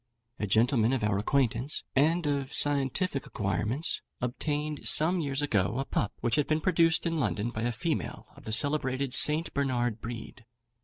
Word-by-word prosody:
A 105 - -2
gentleman 115 +3 +2
of 130 -5 -1
our 105 -2 0
acquaintance, 130 +4 -1
and 160 +5 +2
of 140 -2 -2
scientific 140 +2 0
acquirements, 105 - -2 0.2
obtained 150 +4 -3
some 175 +4 +6
years 140 -2 -2
ago 105 -4 0
a 135 - -2
pup, 105 - -2
which 120 -1 0
had 150 - +1
been 155 0 +1
produced 165 -1 +2
in 165 -1 -1
London 105 - -2
by 110 - -5
a 120 +1 -1
female 120 - -4
of - - -16
the 110 - -5
celebrated 135 +1 +1
St. 155 +2 +4
Bernard 120 -5 -1
breed. 115 -1 -8
135 Hz, 165 wpm, -28 LUFS, 115-150 Hz, 0.2 s, some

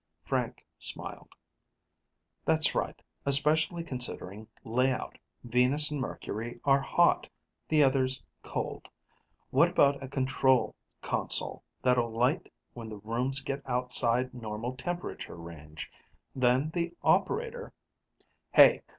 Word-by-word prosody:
Frank 125 0 -2
smiled, - - -4 1.1
"That's 160 -2 +2
right, - - -2 0.2
especially 155 +5 +3
considering 115 - -4 0.2
layout. 125 +3 0 0.2
Venus 125 +5 +3
and 145 -2 -2
Mercury 120 -1 -5
are 140 0 +5
hot; - - +3 0.4
the 155 -2 +5
others, 130 -1 +1 0.2
cold. - - -5 0.6
What 160 +7 +5
about 140 -5 +3
a 135 - -6
control 130 -2 +2 0.3
console - - -1 0.2
that'll 125 -2 +3
light 125 +9 0 0.2
when 115 -2 -8
the 105 - -7
rooms 120 +6 -1
get 135 +1 -4
outside 125 0 +2
normal 115 +1 -5
temperature 175 +6 -5
range? 80 -2 -9 0.4
Then 130 +4 +2
the 170 0 -2
operator 475 +1 +1 0.4
" - - -42
"Hey! - - +8
130 Hz, 110 wpm, -30 LUFS, 120-145 Hz, 1.1 s, Hey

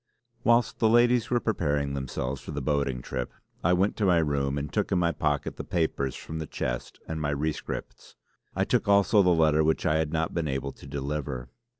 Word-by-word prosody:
Whilst 120 0 +3
the 110 - +4
ladies 120 0 +4
were 120 - +2
preparing 75 -11 0
themselves 65 -1 -3
for - - -11
the - - -3
boating 70 -4 -1
trip 65 -2 -4 0.3
I 90 - +4
went 95 +3 +2
to 105 - +1
my 90 -2 +5
room 70 -3 0
and 70 0 -4
took - - 0
in 95 - +3
my 85 -1 +2
pocket 75 -2 -1
the - - -4
papers 80 -5 -1
from 80 0 -6
the 80 - -4
chest - - -4
and 80 -1 -4
my 75 - 0
rescripts. 75 +2 -4 0.4
I - - +2
took - - +1
also 100 +1 +5
the 90 - +4
letter 80 -2 +4
which 80 +1 +1
I 75 - +3
had 80 -1 0
not 80 0 -1
been 85 -2 -1
able 70 0 -2
to - - -14
deliver. 70 -3 -4
75 Hz, 210 wpm, -27 LUFS, 70-90 Hz, 0.4 s, my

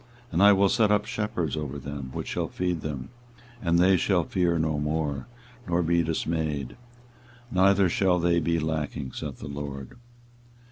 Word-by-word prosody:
24:023:004 - - -17
And 85 - +2
I 100 0 +8
will 100 0 +4
set 115 -4 +3
up 105 0 +2
shepherds 105 - -2
over 75 -2 -4
them 70 -1 -6
which - - -5
shall - - -1
feed 90 -3 -2
them: 70 -4 -5 0.5
and 85 -2 +2
they 90 +2 +5
shall 90 -1 +2
fear 85 -1 +1
no 80 -2 0
more, 75 +2 -2 0.4
nor 85 0 +1
be 85 +1 +2
dismayed, 80 -4 -2 0.8
neither 95 +1 +4
shall 90 +1 +2
they 85 0 +2
be 85 0 +1
lacking, 75 -4 -3
saith - - -6
the - - -8
LORD. 70 -2 -7
85 Hz, 170 wpm, -26 LUFS, 75-90 Hz, 0.8 s, I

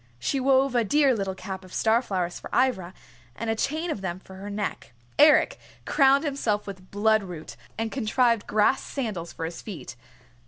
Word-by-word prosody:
She 270 - -1
wove 265 0 +3
a 240 -1 +3
dear 280 +4 +3
little 195 -4 -2
cap 190 0 -7
of 185 - -14
star 225 +4 +2
flowers 180 -7 -3
for - - -9
Ivra, 190 -9 +1 0.4
and 230 0 -2
a - - 0
chain 315 +8 -1
of 205 - -4
them 185 -1 -4
for 190 0 -13
her 200 +2 -7
neck. 200 - -4 0.3
Eric 300 +1 +6 0.3
crowned 275 0 +4
himself 240 -8 -1
with 185 -2 -9
bloodroot 200 - 0 0.2
and 225 0 -2
contrived 235 -2 +1
grass 215 +5 +3
sandals 210 -11 -4
for 165 - -5
his 165 +1 -6
feet. 185 - -8
215 Hz, 180 wpm, -26 LUFS, 190-260 Hz, 0.4 s, Eric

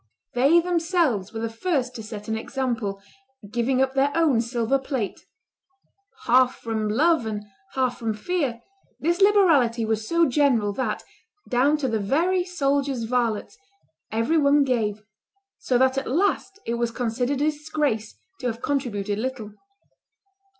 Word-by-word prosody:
They 275 +8 +5
themselves 330 - 0
were 225 - -5
the 230 - -1
first 255 +2 -1
to 235 - -7
set 215 -1 -8
an 220 - -1
example, 225 -4 -3 0.5
giving 250 +3 +1
up 265 0 -2
their 275 +1 +2
own 305 -8 +3
silver 235 +2 0
plate.... 265 -6 -4 1.0
Half 255 +1 +4
from 220 -2 -3
love 295 +2 +2
and 210 -1 -4 0.3
half 255 -2 0
from 225 -2 -2
fear, 255 -3 -2 0.4
this 345 +4 0
liberality 315 - +4
was 220 0 -1
so 335 0 +3
general, 245 -7 +2
that, 220 -2 -2 0.4
down 275 +4 +3
to 285 -3 -1
the 225 -3 0
very 340 - +1
soldiers' 280 -7 -1
varlets, 235 - -1 0.6
every 230 +9 +2
one 285 0 +4
gave; 215 -5 -1 0.6
so 250 - +1
that 260 +1 +3
at 270 - -7
last 390 +5 0
it 235 0 -2
was 235 -1 +1
considered 245 +3 -1
a 300 +2 +2
disgrace 295 -7 -2 0.2
to 250 - -2
have 230 -1 -3
contributed 210 -8 -1
little. 235 -4 -4
255 Hz, 145 wpm, -24 LUFS, 225-295 Hz, 1.0 s, They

